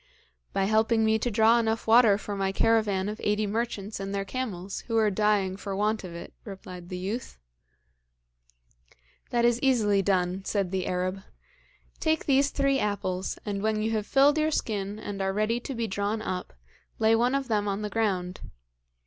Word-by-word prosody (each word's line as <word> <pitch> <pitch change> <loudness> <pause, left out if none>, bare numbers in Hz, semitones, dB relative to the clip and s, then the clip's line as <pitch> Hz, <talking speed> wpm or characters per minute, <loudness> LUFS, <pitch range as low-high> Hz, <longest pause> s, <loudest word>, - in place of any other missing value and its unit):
'By 195 - 0
helping 220 +2 +3
me 220 0 +3
to 245 - -1
draw 225 +2 +4
enough 225 -1 -1
water 225 -3 +6
for 205 -1 -5
my 195 -1 0
caravan 205 -2 +2
of 210 +1 -5
eighty 210 +1 +1
merchants 210 -1 -3
and 195 0 -4
their 195 0 -2
camels, 195 -5 -4
who 230 -1 0
are 215 -2 +3
dying 200 -2 +1
for 200 -1 -5
want 210 +2 0
of 175 -2 -8
it,' 170 - -9
replied 180 -3 -9
the 180 - -4
youth. 200 +7 -5 1.9
'That 235 -1 +2
is 240 0 +3
easily 215 -7 +3
done,' 185 -1 0
said 195 -3 -1
the 190 -1 -2
Arab. 185 +1 -2 0.8
'Take 315 -1 0
these 275 0 +3
three 275 -1 +1
apples, 190 -3 -2
and 200 -2 -3
when 215 0 0
you 220 - 0
have 215 -2 -1
filled 285 +3 +4
your 310 0 +2
skin, 205 -8 -2
and 205 -2 -5
are 190 0 0
ready 215 +3 0
to 265 +2 -6
be 230 0 -1
drawn 205 +1 -2
up, 185 - -4 0.4
lay 225 0 +4
one 245 +4 +2
of 275 -1 -1
them 210 -3 0
on 200 +1 -2
the - - -1
ground. 185 -5 -1
210 Hz, 185 wpm, -27 LUFS, 195-225 Hz, 1.9 s, water